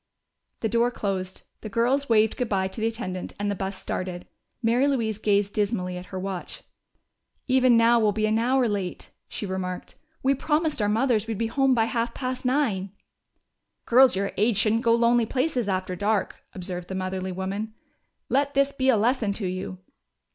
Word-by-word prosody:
The 225 - +1
door 235 +1 +2
closed; 190 -5 -4 0.2
the 215 - -7
girls 245 +5 +1
waved 220 -1 +4
good 250 -2 -2
bye 190 -2 +1
to 215 - -7
the 225 - +2
attendant, 185 -6 -4
and 205 0 -1
the - - -2
bus 190 +1 -4
started. 180 -1 -4 0.4
Mary 240 +5 +3
Louise 225 -6 0
gazed 205 -1 +1
dismally 200 -4 -1
at 180 0 -8
her 190 - -6
watch. 190 -1 -5 0.8
"Even 255 -2 +5
now 230 +1 +5
we'll 215 -2 +3
be 215 +1 0
an 215 +1 +2
hour 250 +1 +2
late," 200 -4 -4 0.2
she - - -4
remarked. 185 -1 -4 0.3
"We 270 +1 +4
promised 300 0 0
our 205 - +2
mothers 225 -1 +1
we'd 225 -2 -3
be 230 - 0
home 270 +3 +2
by 225 -2 +3
half 230 0 -2
past 255 -1 -4
nine!" 235 -8 +1 1.0
"Girls 255 0 +6
your 195 +1 -1
age 215 +1 +2
shouldn't 220 +2 +3
go 230 -1 +4
lonely 235 0 +3
places 255 -4 0
after 185 -1 -1
dark," 205 +1 -1
observed 180 -1 -5
the 190 - -5
motherly 185 0 -3
woman. 195 +4 -4 0.5
"Let 280 +1 +1
this 275 0 +3
be 265 -1 0
a 245 - +5
lesson 225 -1 +1
to 200 0 -3
you!" 185 0 -4
220 Hz, 185 wpm, -25 LUFS, 190-245 Hz, 1.0 s, Girls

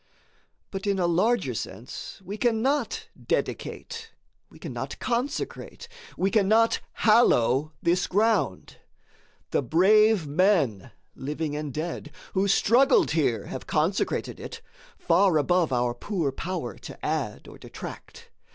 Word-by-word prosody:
But 195 +1 -5
in 200 -1 +1
a 180 - +1
larger 180 - +2
sense 105 +2 -7
we 200 - -5
cannot 260 - 0 0.2
dedicate, 460 -1 -3 0.4
we - - -16
cannot - - -6
consecrate, 255 - -3 0.3
we 195 +2 +1
cannot 220 +2 +3 0.3
hallow 155 - +4
this 175 +2 +2
ground. 205 - 0 0.7
The - - +2
brave 195 - +4
men, 145 - +2 0.3
living 150 +2 -3
and 150 -1 -4
dead, 160 +5 -5 0.2
who 195 +1 +2
struggled 245 - +4
here, 130 -10 +1
have - - -7
consecrated - - 0
it - - -8 0.4
far 175 0 +3
above 175 +2 +2
our 120 -1 +1
power 170 - -3
to - - -9
add - - -2
or - - -12
detract. 470 0 -10
185 Hz, 115 wpm, -26 LUFS, 150-220 Hz, 0.7 s, hallow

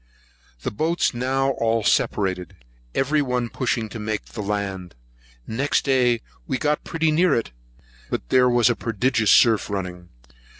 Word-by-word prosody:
The - - -2
boats 160 +10 0
now 135 +2 0
all 115 -1 +1
separated, 95 -4 0 0.4
every 145 +3 +2
one 125 -3 -1
pushing 120 -3 -1
to 115 - -7
make 105 0 -3
the 110 - -7
land. 100 -4 -4 0.5
Next 135 +6 0
day 125 -4 +2 0.3
we 130 - -1
got 150 +2 0
pretty 160 -1 0
near 165 +1 +3
it; 115 - -2 0.6
but - - -4
there 125 -1 +4
was 120 -1 +4
a 120 - +3
prodigious 115 0 0
surf 110 -3 +5
running. 90 -3 -5
120 Hz, 145 wpm, -23 LUFS, 105-135 Hz, 0.6 s, surf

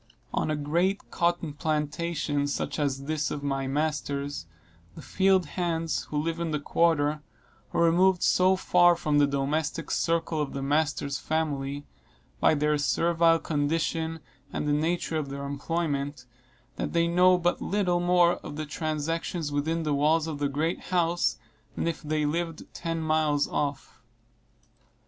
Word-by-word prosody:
On - - 0
a 155 - +1
great 170 +7 -1
cotton 170 -3 0
plantation, 150 -1 -1
such 145 - -3
as 140 -2 -1
this 150 0 -1
of 145 - -5
my 135 -1 -1
master's, 145 - -2 0.5
the - - -9
field 190 -1 +3
hands, 165 -2 -2
who 150 - -4
live 165 +2 -2
in 170 -1 -1
the 150 -1 -1
quarter, 150 -1 +1 0.5
are 170 - +2
removed 180 +2 +4
so 185 +1 +4
far 175 -1 +4
from 150 -3 +1
the 145 - +5
domestic 145 +3 -1
circle 165 -2 0
of 145 - -3
their 135 - -4
master's 145 -1 0
family, 145 -3 -2 0.5
by - - +4
their 150 0 +1
servile 165 +2 +3
condition 160 +1 -1 0.3
and - - -3
the 145 - +2
nature 160 +2 0
of 150 -3 -3
their 140 0 -5
employment, 145 -2 -2 0.5
that - - -3
they 170 0 +3
know 180 +2 +5
but 175 0 0
little 180 -3 +1
more 175 0 +4
of - - -8
the 155 +1 -4
transactions 155 +1 -3
within 160 +3 -1
the 150 -2 0
walls 155 +3 +3
of 155 -3 -5
the 145 -1 0
great 155 +5 -2
house 170 -7 +1 0.4
than - - -1
if 165 -1 -2
they 155 -1 -1
lived 165 +1 -2
ten 165 -1 -3
miles 155 -2 +1
off. 145 -4 -3
155 Hz, 155 wpm, -27 LUFS, 145-170 Hz, 0.5 s, the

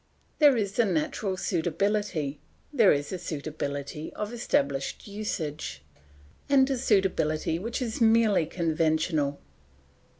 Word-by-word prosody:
"There 290 -5 +6
is 205 0 -2
a 235 - +6
natural 190 +2 -1
suitability, 175 -4 -1 0.3
there 230 -8 +6
is 145 +4 -1
a 185 - -3
suitability 150 -2 -5
of 210 +2 -4
established 140 - -1
usage, 155 - -4 0.7
and 270 -2 +5
a 265 - 0
suitability 175 -8 +1
which 230 +6 -3
is 230 -1 -4
merely 220 -7 +4
conventional. 160 -3 0
180 Hz, 110 wpm, -27 LUFS, 155-215 Hz, 0.7 s, There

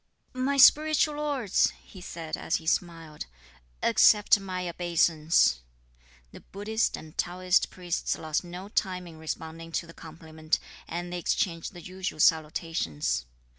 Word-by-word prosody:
"My 260 +2 0
spiritual 305 +2 +5
lords," 280 -9 +1
he 190 - -13
said, 165 -2 -5
as - - -2
he 160 - -4
smiled, 165 -2 -2 0.6
"accept 210 -1 +5
my 185 -2 -4
obeisance." 165 - +2 0.7
The - - -11
Buddhist 220 +3 -2
and 155 -1 -12
Taoist 180 +1 +1
priests 180 -1 -3
lost 155 +1 -2
no 180 +2 -8
time 185 -3 -2
in 165 -2 -12
responding 160 +1 -6
to - - -1
the 165 - -13
compliment, 160 -1 -4 0.3
and 175 +1 -5
they 180 - -2
exchanged 165 +1 -1
the 175 - -10
usual 185 -2 -5
salutations. 155 - +1
175 Hz, 135 wpm, -28 LUFS, 160-190 Hz, 0.7 s, spiritual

